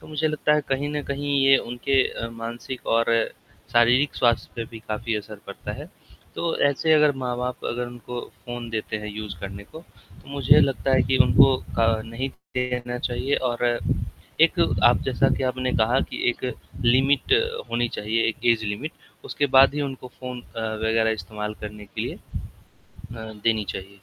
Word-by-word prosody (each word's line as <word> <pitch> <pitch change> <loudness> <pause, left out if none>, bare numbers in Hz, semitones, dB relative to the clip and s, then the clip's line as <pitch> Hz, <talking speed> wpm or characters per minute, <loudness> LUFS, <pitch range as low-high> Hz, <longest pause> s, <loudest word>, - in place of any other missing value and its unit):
तो - - -14
मुझे 155 0 0
लगता 150 0 +1
है 150 - +3
कहीं 135 +2 0
न 145 - -2
कहीं 145 +1 -1
ये 135 0 +8
उनके 125 +3 +1
अ, 115 - -5
मानसिक 115 +2 -7
और 115 0 +3 0.6
शारीरिक 120 +5 +4
स्वास्थ्य 120 -2 +2
पे 115 - -2
भी 115 - -8
काफ़ी 110 +1 -2
असर 105 0 -8
पड़ता - - -6
है, - - -8 0.5
तो 170 -1 -1
ऐसे 150 +3 +2
अगर 150 -1 +5
माँ-बाप 125 -1 -3
अगर 120 +1 -2
उनको 120 0 -7 0.3
फ़ोन 120 -1 -5
देते 110 -1 -3
हैं 105 0 -6
यूज़ 105 -1 -6
करने 100 +1 -7
को, 160 - -12
तो 165 - -21
मुझे 140 -2 +5
लगता 135 0 +1
है 130 - +5
कि 130 +2 +1
उनको 135 +1 +6
अ, 115 -2 0
नहीं 115 +4 -4 0.3
देना 125 -1 -2
चाहिए 130 +3 -1 0.2
और 120 0 0 0.6
एक - - +7 0.3
आप - - +6
जैसा - - +2
कि - - -2
आपने 130 0 -1
कहा 120 +4 +3
कि - - -6
एक 120 - -3 0.4
लिमिट 135 - +3
अ, 465 +2 +1
होनी 120 +1 +1
चाहिए, 110 +2 -1
एक 115 - -4
ऐज 110 -1 -5
लिमिट 105 +10 -3 0.3
उसके 145 - 0
बाद 135 +1 +6
ही 150 - -1
उनको 135 -2 -5
फ़ोन 125 -1 -6
अ, 115 - -8 0.2
वगैरह 110 0 +3
इस्तेमाल 105 +3 -5
करने 105 0 -8
के 100 - -5
लिए - - -3 0.8
अ, 110 -1 -10
देनी 110 -2 +2
चाहिए। 95 0 -6
120 Hz, 180 wpm, -24 LUFS, 115-135 Hz, 0.8 s, ये